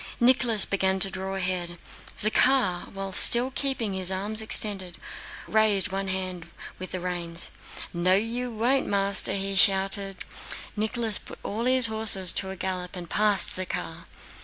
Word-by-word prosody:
Nicholas 240 -3 +4
began 190 -1 -1
to 195 0 +1
draw 190 +1 -6
ahead. 180 -2 -3 0.4
Zakhár, 215 -4 +3
while 195 -1 -6
still 240 +6 +4
keeping 265 -6 -2
his 185 -1 0
arms 205 +3 0
extended, 195 -5 +1 0.5
raised 210 -3 +1
one 195 0 -4
hand 185 -3 -4 0.3
with 185 - -8
the 185 - -5
reins. 175 -1 -4 0.4
"No 180 +2 +1
you 235 +5 -3
won't, 245 +4 -1
master!" 200 -1 -1
he 195 0 -3
shouted. 195 0 +2 0.5
Nicholas 220 0 +1
put - - -12
all 220 +4 -4
his 255 -1 +5
horses 220 -5 +3
to 190 - -3
a 190 - -7
gallop 185 -1 -5
and 175 -2 -9
passed 210 -2 +1
Zakhár. 185 0 -5
195 Hz, 145 wpm, -25 LUFS, 185-220 Hz, 0.5 s, his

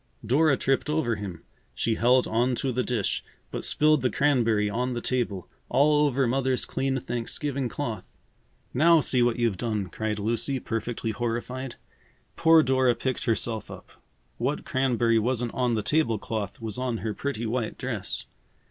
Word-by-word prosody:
Dora 140 +4 +3
tripped 135 +2 0
over 140 -8 0
him. 95 -5 -7 0.3
She 115 - 0
held 125 +3 +4
on 120 +3 +1
to 130 +2 -1
the 125 +1 0
dish, 120 -6 -1 0.3
but - - -4
spilled 155 -1 +3
the 125 - +2
cranberry 115 -8 +2
on 125 +4 -1
the 120 - -2
table, 115 -7 -2 0.2
all 150 +1 +4
over 135 -1 +1
Mother's 130 +1 +1
clean 135 0 -1
Thanksgiving 125 +2 -2
cloth! 115 -10 -5 0.6
"Now, 165 +4 +5
see 130 -4 +2
what 120 -1 +2
you've 115 -5 +1
done!" 105 -3 -2
cried 110 +1 -3
Lucy, 115 +6 -1
perfectly 115 0 -3
horrified. 120 +3 -3 0.6
Poor 160 -1 +6
Dora 130 -2 +3
picked 130 -1 -2
herself 115 -1 -1
up. - - -11 0.5
What 135 +5 -1
cranberry 120 -6 +2
wasn't 120 +1 -1
on 125 -2 +1
the 110 - -1
table 115 -1 +2
cloth 105 -2 -4
was 110 0 -5
on 125 -3 -1
her 110 - -1
pretty 120 0 -3
white 115 0 -2
dress. - - -4
120 Hz, 160 wpm, -26 LUFS, 115-135 Hz, 0.6 s, Poor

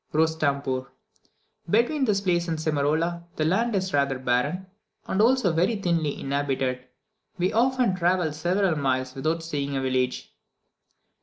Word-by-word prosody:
Rostampoor. 140 -5 0 0.8
Between 240 - +2
this 205 -4 +1
place 175 -3 +1
and 165 -1 -1
Simarola, 155 +3 0
the 155 - 0
land 215 +7 +1
is 190 -1 -1
rather 140 -2 +1
barren, 130 +9 0 0.4
and 190 - 0
also 230 -6 +3
very 180 +8 +2
thinly 170 -7 -1
inhabited; 135 -2 -2 0.5
we 180 +1 0
often 245 -3 +2
travelled 175 -3 +1
several 175 +3 +1
miles 130 -2 -1
without 160 +5 -1
seeing 140 -4 -3
a - - -1
village. 130 -1 -1
160 Hz, 135 wpm, -25 LUFS, 140-185 Hz, 0.8 s, also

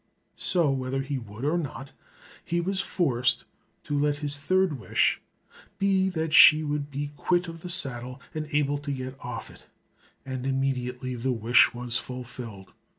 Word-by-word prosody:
So 170 -6 +4
whether 135 0 -3
he 135 0 -4
would 115 +2 -9
or 165 +4 0
not, 135 -3 -8 0.5
he 170 - -2
was 190 +2 -3
forced 125 -10 -1 0.4
to 145 - -4
let 145 0 0
his 145 0 -1
third 175 0 -1
wish - - 0 0.6
be 190 -1 +1
that 160 -3 -4
she 155 0 +8
should 145 -1 -4
be 145 +1 -6
quit 175 +3 -1
of 165 -1 -10
the 180 - -8
saddle, 130 -7 +7
and 155 -1 -5
able 145 -1 -1
to 145 0 -6
get 130 -1 -6
off - - -7
it, - - -19 0.6
and 130 -1 -6
immediately 130 -2 -3
the 125 +2 -3
wish 115 +1 +3
was 120 0 0
fulfilled. 125 -6 -9
140 Hz, 160 wpm, -25 LUFS, 125-155 Hz, 0.6 s, she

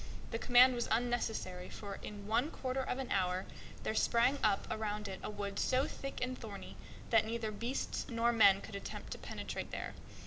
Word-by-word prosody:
The 230 - -2
command 250 +1 +7
was 240 -1 -1
unnecessary, 225 -6 -1
for 200 -2 -7
in 205 -1 -7
one 230 +7 +2
quarter 260 -3 -2
of 255 - -2
an 265 -2 -4
hour 185 -1 +1 0.4
there - - 0
sprang 235 +5 +3
up 205 -2 +3
around 210 -1 -2
it 190 -1 -5
a - - -4
wood 205 -1 -4
so 260 +1 +3
thick 275 - -6
and 255 0 -1
thorny 210 -5 -8 0.4
that 225 -2 +6
neither 225 0 -2
beasts 235 +5 -2
nor 235 0 +2
men 200 -4 +7
could 220 - -9
attempt 200 - -6
to - - -4
penetrate - - -5
there. - - -4
225 Hz, 185 wpm, -35 LUFS, 205-245 Hz, 0.4 s, command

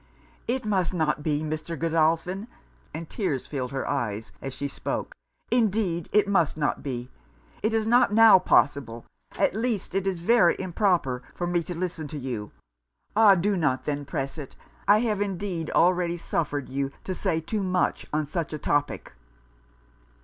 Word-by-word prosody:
'It 250 0 -1
must 190 -4 0
not 155 -3 0
be, 150 0 0
Mr. 155 +2 -4
Godolphin!' 165 - +1 0.4
(and 160 +1 -6
tears 155 - -2
filled 130 -4 -4
her 135 -1 -3
eyes 115 -6 -2
as 135 - -4
she 140 +2 -4
spoke) - - -4 0.4
'Indeed 210 -7 +1
it 210 -1 +4
must 170 -8 +2
not 145 -2 0
be! 125 -3 -5 0.5
It 215 - +1
is 220 -1 +1
not 240 0 +4
now 220 -2 +8
possible, 135 -9 +1 0.3
at - - +2
least 220 -3 -2
it 195 0 0
is 190 -2 0
very 180 -1 +4
improper, 175 - 0
for 175 - -2
me 175 0 +1
to 175 +1 -6
listen 170 -3 -3
to 150 - -7
you. 120 -6 -4 0.7
Ah! 210 -2 +7
do 200 +3 +1
not 145 -7 0
then 145 -1 -2
press 135 +2 -4
it. 140 - -8 0.3
I 210 +2 +6
have 215 -4 0
indeed 190 -4 -3
already 175 -1 +2
suffered 145 -4 -2
you 135 +1 -2
to 190 - -3
say 180 -3 -1
too 205 +6 -3
much 185 -1 0
on 155 0 0
such 160 +2 -3
a - - -2
topic.' 145 - -1
170 Hz, 165 wpm, -26 LUFS, 145-195 Hz, 0.7 s, now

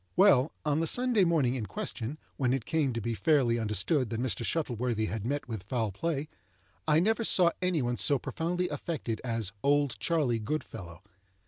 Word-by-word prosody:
Well, 170 -8 +5
on 150 0 +1
the 165 - 0
Sunday 245 -2 +3
morning 155 -8 +2
in 120 -5 -3
question, 150 - -4 0.2
when 130 -3 +1
it 130 -4 -2
came 155 -5 +1
to 115 - -2
be 115 +2 -2
fairly 125 -3 +2
understood 110 - 0
that 115 - -3
Mr. 125 -1 -1
Shuttleworthy 120 -6 -1
had 110 0 -4
met 145 +1 -2
with 110 -5 -5
foul 110 +2 -2
play, 150 - -2 0.6
I 155 0 +5
never 220 +6 +2
saw 180 -5 +5
any 180 -6 +1
one 120 0 -1
so 145 - +4
profoundly 175 +7 -2
affected 135 -10 -4
as 115 -5 -1
"Old 140 -5 +2
Charley 125 -2 +1
Goodfellow." 95 - -5
135 Hz, 180 wpm, -29 LUFS, 115-165 Hz, 0.6 s, Well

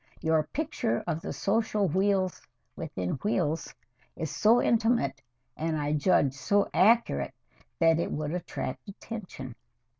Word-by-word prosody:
Your 160 -1 +3
picture 155 - -2
of 165 -2 -2
the 200 - -5
social 215 -1 +1
wheels 190 +2 +1 0.3
within 95 +8 -4
wheels 165 -7 0 0.4
is 160 -3 -4
so 220 +9 +4
intimate, 225 - +2 0.3
and 160 0 -1
I 145 0 0
judge 145 -3 +3
so 200 +9 +1
accurate, 230 +4 +3 0.4
that 165 -1 +4
it - - -1
would 150 0 -2
attract 180 +3 -5
attention." 190 - -7
175 Hz, 125 wpm, -28 LUFS, 150-205 Hz, 0.4 s, so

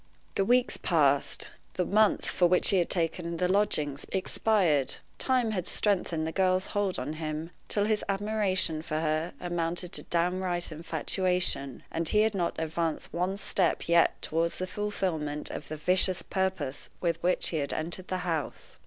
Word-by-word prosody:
The 195 - +1
weeks 245 +4 +3
passed; 145 -5 +1 0.2
the 180 - 0
month 215 +2 +3
for 175 - +2
which 180 +1 +3
he 195 - +3
had 175 - +1
taken 170 -1 -1
the 180 - +1
lodgings 155 -8 +1
expired. 185 - +1 0.2
Time 250 -4 +2
had 185 -5 -2
strengthened 175 -6 0
the 160 - -2
girl's 185 0 +2
hold 205 -2 0
on 135 +4 -3
him 155 +1 -4 0.2
till 205 -1 +1
his 215 0 +1
admiration 195 -5 +1
for 155 - -4
her 155 +1 -1
amounted 175 0 -2
to - - 0
downright 175 0 -1
infatuation, 165 -3 0
and 165 0 0
he 210 - +4
had 220 0 +2
not 175 -3 -1
advanced 160 0 -2
one 180 +3 -1
step 195 -2 0
yet 170 0 +4
toward 165 +1 0
the 185 - -3
fulfillment 180 -8 -2
of 145 - -6
the 155 - -5
vicious 185 +3 +2
purpose 185 -8 -2
with 170 -2 -1
which 180 +1 +1
he 165 - -2
had 140 -2 -1
entered 175 +4 -4
the 185 - -1
house. 165 -4 -4
175 Hz, 165 wpm, -29 LUFS, 160-190 Hz, 0.2 s, he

